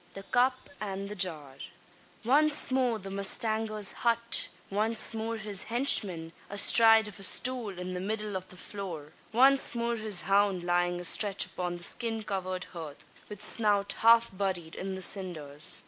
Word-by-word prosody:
THE 195 Hz, -, -9 dB
CUP 255 Hz, +4 st, -1 dB
AND 200 Hz, -1 st, -6 dB
THE 210 Hz, -, -7 dB
JAR. 155 Hz, -8 st, -1 dB, 0.7 s
Once 290 Hz, +3 st, +3 dB
more 255 Hz, -3 st, 0 dB
the 195 Hz, -2 st, -10 dB
mustanger's 215 Hz, +1 st, 0 dB
hut! 235 Hz, 0 st, 0 dB, 0.2 s
Once 220 Hz, +3 st, +1 dB
more 225 Hz, +1 st, -4 dB
his 205 Hz, -3 st, -1 dB
henchman, 195 Hz, -10 st, +2 dB, 0.2 s
astride 225 Hz, +2 st, +4 dB
of 210 Hz, -, -11 dB
a -, -, -12 dB
stool 225 Hz, 0 st, 0 dB
in 180 Hz, 0 st, -7 dB
the 180 Hz, -, -5 dB
middle 210 Hz, +1 st, -5 dB
of 185 Hz, 0 st, -6 dB
the 185 Hz, -, -11 dB
floor! 170 Hz, -7 st, -8 dB, 0.2 s
Once 265 Hz, +2 st, +5 dB
more 235 Hz, 0 st, -2 dB
his 215 Hz, -5 st, +3 dB
hound 195 Hz, -2 st, 0 dB
lying 175 Hz, 0 st, -1 dB
astretch 195 Hz, +3 st, +4 dB
upon 175 Hz, -1 st, -6 dB
the 175 Hz, -, -7 dB
skin 225 Hz, +2 st, -3 dB
covered 185 Hz, -3 st, -5 dB
hearth, 160 Hz, -5 st, -10 dB, 0.2 s
with 210 Hz, -2 st, -5 dB
snout 205 Hz, -3 st, +1 dB
half 230 Hz, -2 st, +3 dB
buried 185 Hz, -4 st, -4 dB
in 190 Hz, 0 st, -6 dB
the 190 Hz, -, -1 dB
cinders! 160 Hz, -7 st, +2 dB
200 Hz, 160 wpm, -28 LUFS, 185-225 Hz, 0.7 s, Once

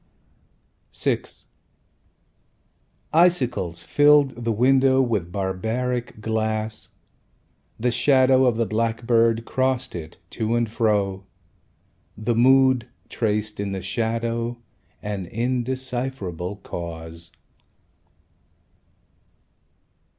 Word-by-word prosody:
VI -, -, +1 dB, 1.9 s
Icicles 125 Hz, -, +2 dB
filled 145 Hz, -1 st, +5 dB
the 115 Hz, 0 st, -3 dB
window 130 Hz, +3 st, +4 dB
With 110 Hz, -9 st, 0 dB
barbaric 110 Hz, +5 st, -2 dB
glass. 110 Hz, 0 st, -2 dB, 0.9 s
The 125 Hz, +2 st, +1 dB
shadow 130 Hz, 0 st, +4 dB
of 120 Hz, -3 st, +2 dB
the 115 Hz, -, +1 dB
blackbird 115 Hz, +1 st, +1 dB
Crossed 130 Hz, -1 st, -1 dB
it, 80 Hz, -2 st, -8 dB
to 110 Hz, +1 st, -1 dB
and 120 Hz, -1 st, +1 dB
fro. 105 Hz, -4 st, 0 dB, 0.9 s
The 110 Hz, +3 st, -1 dB
Mood 130 Hz, 0 st, +4 dB, 0.2 s
Traced 105 Hz, -1 st, -2 dB
in 100 Hz, -1 st, -2 dB
the 95 Hz, -, -5 dB
shadow 115 Hz, +1 st, -2 dB, 0.5 s
An 100 Hz, -3 st, -4 dB
indecipherable 120 Hz, -5 st, -3 dB
cause. 85 Hz, 0 st, -7 dB
115 Hz, 80 wpm, -23 LUFS, 105-125 Hz, 1.9 s, filled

